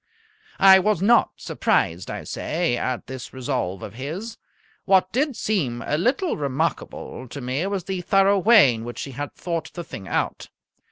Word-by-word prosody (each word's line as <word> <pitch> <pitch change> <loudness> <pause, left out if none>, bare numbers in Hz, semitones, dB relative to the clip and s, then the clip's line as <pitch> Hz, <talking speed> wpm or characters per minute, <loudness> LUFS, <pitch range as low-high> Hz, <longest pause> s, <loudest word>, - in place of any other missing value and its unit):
I 190 -1 +8
was 210 -1 +1
not 230 +6 +4
surprised, 85 +2 0
I - - -5
say, 165 -6 -1
at 125 +1 -3
this 130 -1 -8
resolve 125 -8 -3
of 100 - -7
his. 170 - -6 0.5
What 190 -1 +3
did 275 +2 0
seem 140 - -1
a 150 - 0
little 265 - 0
remarkable 140 -2 -3
to 140 - -8
me 130 +7 -2
was 195 -2 -2
the 185 0 -3
thorough 195 +2 +3
way 200 - +6
in 115 0 -6
which 120 +1 -6
he 140 - -7
had 145 +3 -6
thought 165 -2 -4
the 175 - -5
thing 100 -11 -9
out. - - -2
165 Hz, 170 wpm, -23 LUFS, 130-195 Hz, 0.5 s, I